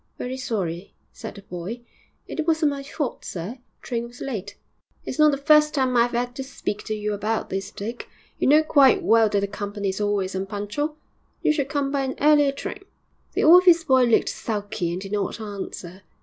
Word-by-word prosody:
'Very 250 +1 -4
sorry,' 200 -9 -4 0.2
said - - -8
the 200 - -11
boy; 180 +6 -6 0.5
'it 315 0 -4
wasn't 315 -2 +3
my 280 -1 -5
fault, 280 -1 -4
sir; 195 +9 -6 0.2
train 235 -1 -3
was 240 +1 -15
late.' 205 -6 -5 0.5
'It's - - -5
not 305 0 +7
the 280 - 0
first 300 +1 +4
time 260 -2 +1
I've 235 0 +3
'ad 245 +1 -2
to 270 - -3
speak 260 -6 -5
to 215 - -2
you 210 0 -2
about 215 +2 -2
this, 195 +1 -3
Dick; 230 +4 -7 0.3
you - - +1
know 300 +3 +6
quite 280 -4 +5
well 225 -1 +5
that 205 - +1
the 200 - 0
company 205 0 -4
is 190 +2 -3
always 205 -2 0
unpunctual; 205 +10 -3 0.5
you 305 - +4
should 280 -3 -1
come 285 -2 -1
by 280 -1 0
an 265 -1 -2
earlier 295 -1 +5
train.' 390 +7 -7 0.5
The - - 0
office 345 0 +7
boy 260 -3 +4
looked 235 - +3
sulky 205 -5 -3
and 175 - -3
did 195 0 -8
not 205 +1 -2
answer. 195 -3 -7
235 Hz, 195 wpm, -24 LUFS, 205-280 Hz, 0.5 s, not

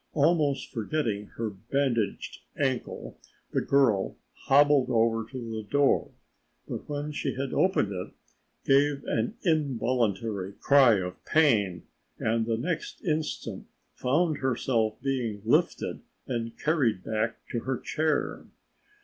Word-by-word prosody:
Almost 150 -2 +2
forgetting 110 -4 -2
her 115 -2 -2
bandaged 115 +2 -1 0.2
ankle, 130 -3 -2 0.3
the - - +1
girl 120 -9 +2 0.3
hobbled 145 -1 +5
over 115 -2 +2
to 130 - -7
the 110 -1 -3
door, 140 +6 +2 0.6
but - - -6
when 145 +1 -3
she 150 - -2
had 135 0 -3
opened 185 - +2
it 90 -1 -5 0.5
gave 140 +1 +3
an 115 - -1
involuntary 115 - 0
cry 135 -1 +5
of 90 -2 -4
pain 105 - +2 0.3
and 115 0 0
the 115 -1 +1
next 180 - -4
instant 155 -4 -2 0.3
found 155 +4 +1
herself 120 -4 0
being 120 -7 -2
lifted 115 - +1 0.2
and 115 -2 -4
carried 130 - +1
back 110 +1 -2
to 120 - -1
her 130 +2 -2
chair. 155 +1 -1
125 Hz, 120 wpm, -28 LUFS, 110-145 Hz, 0.6 s, hobbled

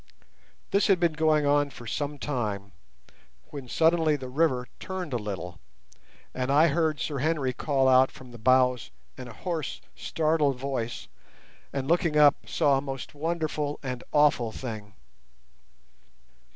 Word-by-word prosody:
This 200 0 +3
had 195 -3 +4
been 170 -2 +2
going 155 -1 +2
on 145 0 +3
for 120 -3 -12
some 145 +5 -3
time, 105 -9 -3 0.8
when 140 -3 -7
suddenly 160 +2 +3
the 130 -3 -6
river 130 -3 +1
turned 185 -6 -5
a - - +1
little, 95 -6 -6 0.7
and 130 +1 -2
I 155 +4 +5
heard 155 -1 0
Sir 140 +1 -3
Henry 145 -3 0
call 135 -1 +1
out 130 0 +6
from 130 -2 -14
the 120 - -11
bows 125 0 +3 0.3
in 130 - -8
a 120 - -10
hoarse, 165 - -4 0.2
startled 155 -4 0
voice, 125 -3 -4 0.6
and, 135 -1 -3
looking 170 -2 +2
up, 145 -1 +4
saw 140 -4 +3
a - - -4
most 135 -1 -6
wonderful 155 -1 -2
and 125 -2 -4
awful 145 -6 +3
thing. 110 -5 -7
140 Hz, 145 wpm, -27 LUFS, 125-155 Hz, 0.8 s, out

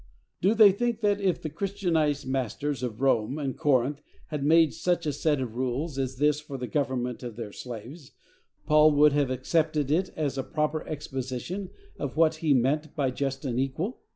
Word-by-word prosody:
Do 200 +5 +3
they 215 -3 +8
think 235 +3 -1
that, 205 -1 +2
if 185 -4 +1
the 155 - -5
Christianized 170 -5 0
masters 135 +1 -2
of 120 -2 -4
Rome 130 0 +2
and 140 -3 -3
Corinth 140 -1 +1 0.3
had 150 -3 -3
made 160 +1 +5
such 175 -2 0
a 150 - 0
set 145 0 +1
of 125 -4 -4
rules 130 +4 -2
as 130 -1 -2
this 150 +2 +2
for 150 -2 -7
the 125 - -4
government 125 -3 -2
of 120 -3 -7
their 115 -3 -6
slaves, 125 +7 -9 0.5
Paul 150 0 +5
would 145 0 +5
have 145 -2 +2
accepted 150 +2 0
it 185 +4 +2
as 140 -3 -2
a - - -1
proper 150 +1 -1
exposition 145 +5 -5 0.3
of 140 0 -4
what 160 -1 +4
he 155 -1 0
meant 140 +4 +1
by 135 -3 0
just 135 +1 -3
and 125 -2 -1
equal? 155 - -2
145 Hz, 185 wpm, -27 LUFS, 130-160 Hz, 0.5 s, they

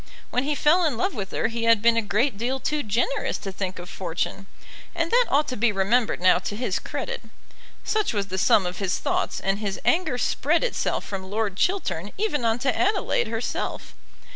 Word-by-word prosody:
When 250 +2 0
he 295 +1 0
fell 320 +6 +4
in 295 -8 +1
love 380 - 0
with 200 -3 -4
her - - 0
he 230 0 -2
had 230 -1 +5
been 230 +2 +4
a 230 - +3
great 225 +5 +1
deal 245 +6 -2
too 300 +2 -1
generous 240 +4 0
to 195 - -6
think 190 -1 -4
of 175 0 -8
fortune, 185 +1 -4 0.5
and 335 -1 -1
that - - +4
ought 295 +2 +3
to 255 - -3
be 230 0 +2
remembered 210 +4 +1
now 185 0 +5
to 205 - -4
his 210 -4 -1
credit. 485 0 -4 0.6
Such 430 -1 0
was 200 -2 -2
the 190 +1 -2
sum 190 0 +4
of 180 +1 -4
his 195 -3 0
thoughts, - - -1
and 195 +1 -1
his 205 -2 -3
anger 330 -7 +2
spread 305 - +1
itself - - -1
from 190 -1 -6
Lord 210 -2 -1
Chiltern 210 - -1
even 390 - 0
on 225 0 +2
to 260 - +2
Adelaide 390 - +1
herself. 225 +1 -3
230 Hz, 205 wpm, -25 LUFS, 195-295 Hz, 0.6 s, had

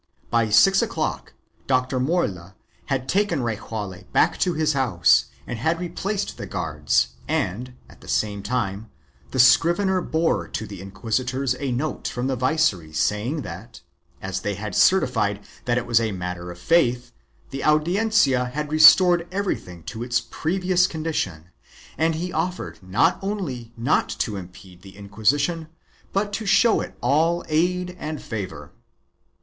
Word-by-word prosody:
By 115 -2 +2
six 195 - +5
o'clock - - -3 0.3
Dr. 130 0 +1
Morla 100 - -1 0.3
had 130 -2 -2
taken 185 -8 +1
Rejaule 105 -4 -5
back - - +2
to 180 -3 +1
his 155 0 +1
house 110 -11 +3 0.2
and 120 - -5
had 160 +7 0
replaced 195 +3 -3
the - - -6
guards 75 -6 0 0.2
and, 125 +7 -2
at - - -18
the - - -14
same 105 -1 -1
time, 105 -1 -3 0.4
the - - -5
scrivener 175 +9 +4
bore 165 0 0
to 110 - -4
the 100 -4 -9
inquisitors 125 +7 -2
a 140 -3 -2
note 140 +6 -2
from 125 +1 -3
the 135 0 0
viceroy 125 - 0
saying 105 - -1
that, 95 +7 -9 0.4
as 95 0 -3
they 100 +1 -3
had 105 -1 -6
certified 105 - +2 0.2
that 120 0 +1
it 125 - -1
was 115 -1 +3
a 110 -1 -1
matter 90 -1 -5
of 85 - -8
faith, 125 - +2 0.4
the 135 - -5
Audiencia 155 - +3
had 150 +4 -4
restored 170 +2 +7
everything 180 - -3
to 110 +5 -7
its 120 0 +1
previous 180 +9 0
condition 105 - -4 0.4
and 160 0 +1
he 175 +3 -4
offered 180 -9 -3
not 100 - +2
only 165 - -4
not 120 +7 +1
to 105 - -2
impede 90 -1 -11
the 95 +1 -14
Inquisition 140 - 0 0.4
but 205 +1 -1
to 215 +1 -3
show 220 +4 +4
it - - -8
all 160 +7 +2
aid 180 +3 0
and 155 -1 -4
favor. 95 -10 -6
125 Hz, 150 wpm, -23 LUFS, 100-165 Hz, 0.4 s, restored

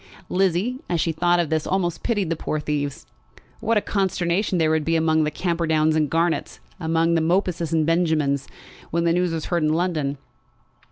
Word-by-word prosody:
Lizzie, 195 +7 +1
as 170 - 0
she 165 - +1
thought 175 +2 +2
of 165 -3 -1
this, 155 -1 0
almost 175 -3 -1
pitied 205 -8 -1
the - - +1
poor 155 -1 -3
thieves. 145 -2 -3 0.5
What 225 +1 +1
a - - +3
consternation 190 -1 0
there 160 -2 +2
would 160 -1 +1
be 165 +2 +1
among 160 -1 +2
the - - 0
Camperdowns 160 -1 +1
and 155 -2 +1
Garnetts, 165 +2 0 0.2
among 165 0 +1
the 165 - +2
Mopuses 170 -1 0
and 160 -2 +2
Benjamins, 160 -5 +1 0.4
when 170 +1 0
the 170 0 +2
news 180 0 +1
was 160 -2 -3
heard 175 -2 0
in 155 0 +2
London! 155 -5 -1
165 Hz, 185 wpm, -23 LUFS, 155-175 Hz, 0.5 s, a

